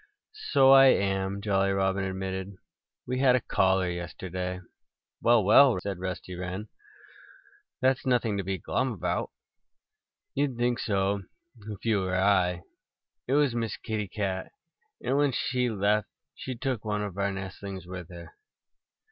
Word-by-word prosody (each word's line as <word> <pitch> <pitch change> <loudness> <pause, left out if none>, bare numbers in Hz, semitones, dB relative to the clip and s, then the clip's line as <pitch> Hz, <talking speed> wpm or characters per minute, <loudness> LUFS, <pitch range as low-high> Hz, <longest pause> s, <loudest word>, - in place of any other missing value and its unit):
"So 135 -2 +6
I 135 0 +9
am," 95 -3 +1
Jolly 100 -1 +1
Robin 95 0 0
admitted. 95 0 -4 0.5
"We 125 +1 -2
had 130 -2 +5
a - - +3
caller 95 -4 +1
yesterday." 90 +1 -4 0.6
"Well, 115 -2 +4
well!" 115 +2 +6
said 95 -1 -5
Rusty 95 0 -5
Wren. 90 +4 -5 1.1
"That's 130 0 +2
nothing 120 -4 +1
to - - -2
be 95 +1 -2
glum 130 +8 -1
about." 95 - -2 1.0
"You'd 140 -3 -1
think 120 0 +1
so 100 -2 0 0.5
if 105 +1 -8
you 110 -3 +2
were 95 -1 -1
I. 90 -2 +2 0.6
It 130 - 0
was 145 -3 +3
Miss 115 -3 -2
Kitty 110 -3 -3
Cat. 95 -1 -3 0.5
And 135 - +1
when 145 -2 +2
she 125 +1 0
left 105 -1 +1 0.3
she 130 - -6
took 130 -3 -3
one 105 -1 -1
of 100 -3 -5
our 100 0 +1
nestlings 95 0 -7
with 90 -2 -8
her." 85 -2 -11
100 Hz, 145 wpm, -28 LUFS, 95-120 Hz, 1.1 s, I